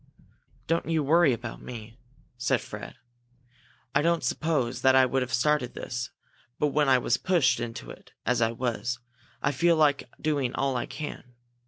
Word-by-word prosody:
"Don't 165 Hz, +1 st, 0 dB
you 160 Hz, -2 st, +2 dB
worry 160 Hz, +1 st, +5 dB
about 120 Hz, -1 st, -5 dB
me!" 115 Hz, 0 st, -9 dB, 0.4 s
said 125 Hz, +2 st, +1 dB
Fred. -, -, -8 dB, 1.0 s
"I 140 Hz, -, +4 dB
don't 170 Hz, +1 st, +2 dB
suppose 145 Hz, -6 st, 0 dB
that 130 Hz, 0 st, +5 dB
I 130 Hz, 0 st, +7 dB
would 130 Hz, +1 st, 0 dB
have 125 Hz, -1 st, -3 dB
started 125 Hz, +1 st, +1 dB
this, 120 Hz, -1 st, -4 dB, 0.5 s
but 150 Hz, -, +2 dB
when 145 Hz, -1 st, +2 dB
I 130 Hz, -, +6 dB
was 120 Hz, -1 st, +1 dB
pushed 175 Hz, -3 st, +2 dB
into 120 Hz, -1 st, -5 dB
it -, -, -14 dB
as 125 Hz, 0 st, +1 dB
I 115 Hz, 0 st, +3 dB
was, 120 Hz, +1 st, -2 dB, 0.5 s
I 140 Hz, -, +3 dB
feel 170 Hz, +5 st, +3 dB
like 145 Hz, -5 st, +2 dB
doing 145 Hz, -5 st, 0 dB
all 135 Hz, -1 st, 0 dB
I 120 Hz, -, -2 dB
can. 135 Hz, -5 st, -7 dB
130 Hz, 170 wpm, -27 LUFS, 120-150 Hz, 1.0 s, I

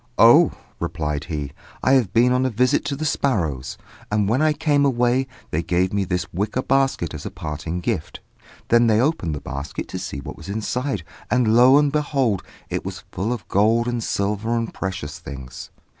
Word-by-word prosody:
"Oh!" -, -, +7 dB, 0.3 s
replied 75 Hz, -2 st, -3 dB
he, 75 Hz, -5 st, -4 dB, 0.3 s
"I -, -, +3 dB
have 125 Hz, -8 st, +3 dB
been 120 Hz, +2 st, +4 dB
on 125 Hz, +1 st, +2 dB
a 130 Hz, -, +2 dB
visit 125 Hz, +2 st, +2 dB
to 145 Hz, -1 st, -1 dB
the 155 Hz, +3 st, -4 dB
sparrows; 80 Hz, -, -1 dB, 0.3 s
and 105 Hz, -1 st, +1 dB
when 120 Hz, +7 st, +2 dB
I 155 Hz, 0 st, +4 dB
came 145 Hz, -1 st, +2 dB
away, 125 Hz, 0 st, +2 dB, 0.2 s
they 80 Hz, -, 0 dB
gave 90 Hz, +2 st, 0 dB
me 100 Hz, -1 st, +1 dB
this 90 Hz, -1 st, -1 dB
wicker 105 Hz, +8 st, -1 dB
basket 135 Hz, -11 st, +1 dB
as 75 Hz, -, -6 dB
a -, -, -4 dB
parting 80 Hz, +1 st, -5 dB
gift." 80 Hz, -2 st, -3 dB, 0.5 s
Then 120 Hz, 0 st, +5 dB
they 110 Hz, -1 st, +4 dB
opened 125 Hz, -, 0 dB
the 70 Hz, -, -6 dB
basket 70 Hz, +1 st, -5 dB
to -, -, -4 dB
see -, -, -5 dB
what 70 Hz, -, -8 dB
was -, -, -10 dB
inside, 110 Hz, -, -2 dB, 0.3 s
and, 120 Hz, -3 st, +3 dB
lo 125 Hz, +3 st, +7 dB
and 145 Hz, -1 st, +3 dB
behold! 135 Hz, -8 st, +1 dB, 0.3 s
it -, -, -3 dB
was -, -, -6 dB
full 100 Hz, +6 st, -2 dB
of 120 Hz, -4 st, -4 dB
gold 115 Hz, +4 st, +3 dB
and 120 Hz, -2 st, -1 dB
silver 105 Hz, +4 st, -1 dB
and 115 Hz, -1 st, -3 dB
precious 90 Hz, -6 st, -5 dB
things. 65 Hz, -3 st, -9 dB
110 Hz, 190 wpm, -22 LUFS, 85-125 Hz, 0.5 s, Oh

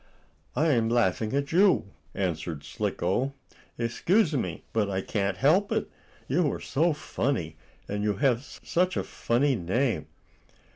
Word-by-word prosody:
"I 160 Hz, +2 st, +3 dB
am 115 Hz, -5 st, +3 dB
laughing 110 Hz, -2 st, +1 dB
at 140 Hz, 0 st, -1 dB
you," 180 Hz, -, +4 dB, 0.2 s
answered 80 Hz, -5 st, -2 dB
Slicko. 95 Hz, -, -1 dB, 0.4 s
"Excuse 160 Hz, -, +2 dB
me, 95 Hz, -, -2 dB
but 105 Hz, -3 st, +1 dB
I 95 Hz, -1 st, -1 dB
can't 100 Hz, -2 st, -1 dB
help 170 Hz, -, +3 dB
it. -, -, -1 dB, 0.4 s
You 150 Hz, +1 st, +2 dB
are -, -, -5 dB
so 165 Hz, +5 st, +1 dB
funny, 120 Hz, -, -2 dB, 0.3 s
and 105 Hz, 0 st, -2 dB
you 105 Hz, -1 st, +1 dB
have 120 Hz, +3 st, +2 dB, 0.2 s
such 180 Hz, +1 st, +1 dB
a -, -, 0 dB
funny 130 Hz, +4 st, +1 dB
name." 110 Hz, -, 0 dB
115 Hz, 140 wpm, -27 LUFS, 95-145 Hz, 0.4 s, you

